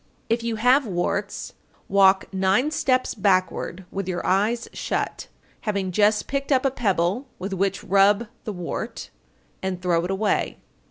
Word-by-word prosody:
_ - - -38 0.3
912. 230 - +3
If - - -10
you 230 -1 -1
have 250 +4 +4
warts, 200 +2 -2 0.3
walk 195 0 +4
nine 195 +10 +2
steps 255 -4 +1
backward 185 -2 0
with 195 -1 -4
your 180 -2 -3
eyes 215 +5 +1
shut, - - -3 0.3
having 200 -3 -2
just 210 +3 +3
picked 275 +1 -3
up 265 0 +3
a 270 - +3
pebble 205 +1 0
with 195 +2 -4
which 195 +1 -1
rub 200 +3 +4 0.2
the 215 - -4
wart, 180 -3 -5 0.5
and 190 -1 -2
throw 175 -2 +1
it 180 - -3
away. 200 +2 0
200 Hz, 160 wpm, -24 LUFS, 190-230 Hz, 0.5 s, have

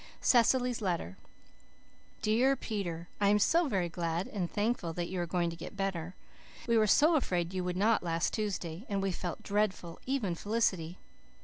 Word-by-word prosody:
CECILY'S 245 0 +3
LETTER 170 - -2 1.1
"DEAR 240 +6 +3
PETER: 175 -9 -4
I 200 -1 +4
am 210 - +5
so 330 - +3
very 190 -8 0
glad 170 +1 -2
and 180 -5 -3
thankful 205 -6 -1
that 175 +1 -3
you 185 -1 -2
are 175 - -2
going 170 0 0
to - - -7
get 170 +4 -9
better. 185 -3 -3 0.5
We 235 - +3
were 215 -1 +4
so 305 +10 +5
afraid 175 - -1
you 185 -1 -1
would 180 0 -2
not 220 +3 +3
last 165 -1 -1
Tuesday, 190 -5 -3
and 200 -1 0
we 195 - +1
felt 175 0 -5
dreadful, 200 -5 -1
even 255 -9 0
Felicity. 185 -4 -1
190 Hz, 175 wpm, -31 LUFS, 175-220 Hz, 1.1 s, am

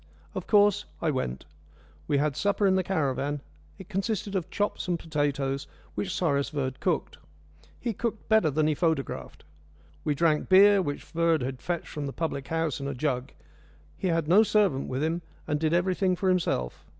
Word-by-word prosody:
Of 185 - -5
course 205 -1 +4
I 160 - +1
went. 65 - -3 0.6
We 145 - +2
had 145 -1 +1
supper 200 0 +1
in 190 - +5
the 190 - +3
caravan. 145 -5 -1 0.4
It 190 -2 -11
consisted 200 +1 -2
of 185 -4 -1
chops 205 -2 -2
and 175 -1 +1
potatoes, 140 -3 -1 0.3
which 190 - -3
Cyrus 140 -7 +1
Verd 135 -3 -3
cooked. - - -1 0.6
He 235 -2 -2
cooked 225 +1 -3
better 220 -8 +4
than 150 +2 +1
he 155 - +3
photographed. 160 -3 -2 0.6
We 150 - 0
drank 155 0 +2
beer, 200 +1 +7
which 145 -5 -3
Verd 165 -2 +1
had 130 0 -4
fetched 175 -2 -3
from 145 -2 -4
the 135 - -5
public 155 -4 -3
house 160 -4 -1
in 140 - -4
a 140 - -3
jug. 130 -1 -1 0.6
He 190 - -2
had 165 -3 +1
no 185 +6 +7
servant 205 -10 +2
with 130 +3 -1
him, 165 +2 0 0.3
and 150 - 0
did 155 0 +1
everything 185 +2 +2
for 190 +1 0
himself. 170 - 0
165 Hz, 180 wpm, -28 LUFS, 140-190 Hz, 0.6 s, beer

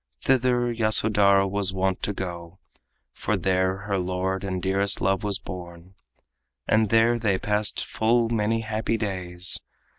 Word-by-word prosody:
Thither 125 - +1
Yasodhara 105 -3 +3
was 95 -1 0
wont 95 0 -1
to - - -2
go, 90 -2 -7 0.6
For - - -2
there 95 +1 0
her 100 -2 -1
lord 95 +1 -2
and 95 -2 -3
dearest 95 +1 0
love 95 +1 0
was 100 -2 -1
born, 90 -2 -10 0.7
And 110 -1 +2
there 115 +2 +3
they 105 -4 +1
passed 105 +2 -1
full 115 +1 +1
many 115 0 0
happy 110 +1 -2
days. 90 -4 +2
100 Hz, 140 wpm, -24 LUFS, 95-110 Hz, 0.7 s, Yasodhara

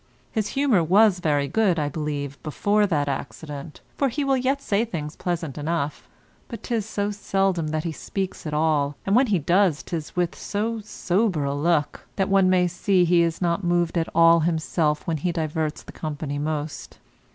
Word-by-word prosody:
His 215 -4 -1
humour 260 -11 +3
was 195 +3 +4
very 145 -4 +1
good, 195 +2 +2
I 150 -2 0
believe, 145 -2 -4
before 205 +7 +1
that 150 -6 0
accident, 145 +2 -6 0.2
for 275 - +3
he 280 +5 -2
will 275 -1 +2
yet 265 +2 0
say 215 -5 0
things 155 -10 -5
pleasant 165 -5 -3
enough, 150 -1 -3 0.4
but 230 - -8
'tis 225 -3 -2
so 205 -1 -2
seldom 195 -4 0
that 155 0 -2
he 165 - -2
speaks 190 +1 -5
at 150 - -4
all, 150 -2 +1
and 195 - +2
when 255 +2 +5
he 205 -4 +2
does 175 0 +2
'tis 160 -3 -5
with 175 -1 0
so 225 +3 -2
sober 195 -4 0
a 140 0 -1
look, 150 +1 0
that 195 0 0
one 195 -1 +4
may 180 -1 +3
see 180 +1 +2
he 175 0 +4
is 165 +1 0
not 170 +3 0
moved 175 -1 +1
at 165 -1 0
all 165 0 +6
himself 160 -2 0
when 165 -2 -1
he 175 +4 -1
diverts 155 -2 -2
the - - -11
company 145 -2 -4
most. 150 0 -4
170 Hz, 185 wpm, -24 LUFS, 150-200 Hz, 0.4 s, all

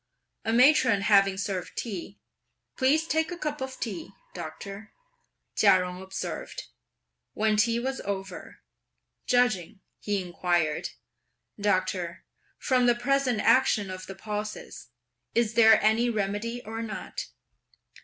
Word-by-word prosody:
A 225 - -1
matron 250 -3 +5
having 195 -2 +4
served 195 -2 -4
tea; 200 -3 -5 0.6
"Please 290 +5 +2
take 320 +1 0
a 350 - -5
cup 300 -3 -4
of 265 0 -5
tea, 315 +8 -5 0.2
doctor," 200 +2 -8 0.6
Chia 200 -3 +6
Jung 180 0 -4
observed. 190 0 -5 0.7
When 215 0 +1
tea 230 +2 +2
was 265 +2 -3
over, 195 -1 -6 0.7
"Judging," 215 -6 +1 0.2
he 205 -1 -1
inquired, 175 -3 -1 0.7
"Doctor, 185 -3 -1 0.3
from 255 -2 +2
the 240 - +5
present 250 -2 +1
action 215 -7 +3
of 185 0 -8
the 195 - -7
pulses, 210 +1 -6 0.5
is 230 -1 +2
there 220 -1 +7
any 220 +3 +3
remedy 220 +3 -2
or 225 +1 -5
not?" 225 -2 -5
215 Hz, 120 wpm, -27 LUFS, 195-245 Hz, 0.7 s, there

